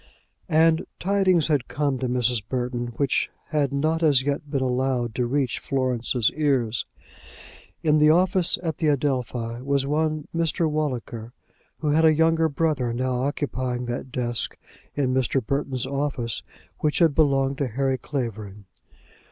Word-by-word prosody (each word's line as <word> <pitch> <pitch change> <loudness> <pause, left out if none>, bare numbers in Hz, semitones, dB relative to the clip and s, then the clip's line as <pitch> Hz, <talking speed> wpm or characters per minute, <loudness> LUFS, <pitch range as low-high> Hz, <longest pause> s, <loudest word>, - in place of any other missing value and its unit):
And 160 0 +3
tidings 190 -3 +2
had 145 -6 0
come 145 -3 -1
to 130 - -1
Mrs. 125 -2 +1
Burton 125 -1 -2
which 140 -2 +1 0.2
had 145 -4 +1
not 155 +4 0
as 145 -5 +4
yet 145 +1 -2
been 135 -2 0
allowed 125 -2 0
to 125 +1 -1
reach 135 -1 0
Florence's 125 -3 0
ears. 130 -7 0 1.0
In 155 -1 +4
the 150 0 +6
office 180 +2 +3
at 160 -2 -2
the 160 - +1
Adelphi 125 -5 -1
was 140 0 +1
one 155 +1 -1
Mr. 165 0 +1
Walliker, 125 -6 -3 0.5
who 150 - 0
had 155 +2 +3
a 160 -1 +6
younger 160 0 +3
brother 145 -5 0
now 125 0 -1
occupying 130 -4 -2
that 120 +2 -5
desk 120 -3 -2 0.4
in 130 -3 +1
Mr. 130 0 +1
Burton's 135 -1 -1
office 135 -4 -2 0.4
which 150 -1 0
had 165 -4 +4
belonged 135 -2 +2
to 140 - 0
Harry 130 +2 -1
Clavering. 110 -7 -5
135 Hz, 145 wpm, -24 LUFS, 125-155 Hz, 1.0 s, the